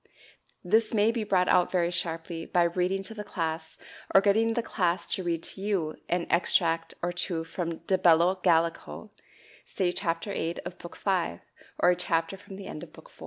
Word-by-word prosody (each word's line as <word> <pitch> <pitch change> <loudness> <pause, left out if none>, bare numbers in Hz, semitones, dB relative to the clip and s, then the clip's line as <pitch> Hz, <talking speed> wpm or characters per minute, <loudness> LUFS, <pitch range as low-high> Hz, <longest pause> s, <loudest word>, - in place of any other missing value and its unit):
This 220 +4 +2
may 215 +1 +4
be 230 -2 -2
brought 185 -3 +2
out 180 - +4
very 175 -2 +1
sharply 165 -1 -4
by 175 - +3
reading 180 +3 0
to 225 - -6
the 210 -1 -6
class, 160 -5 -4 0.4
or - - +10
getting 220 +3 +2
the 235 - 0
class 180 -5 0
to - - 0
read 170 -2 -2
to 190 - -2
you, 190 -7 -1
an 175 0 0
extract 165 -1 +2
or 175 - 0
two 175 -2 -2
from 165 0 -4
"De 190 +1 +2
Bello 175 0 +5
Gallico," 165 - 0 0.6
say 180 -2 0
Chapter 175 +1 -2
8 165 -1 -2
of 180 0 -7
Book 175 - -10
V, 180 - -1 0.4
or 180 - +5
a - - +2
chapter 165 0 -1
from 195 0 -12
the 195 0 -9
end 155 - -7
of - - -10
Book - - -15
IV. - - -26
175 Hz, 195 wpm, -28 LUFS, 165-195 Hz, 0.6 s, or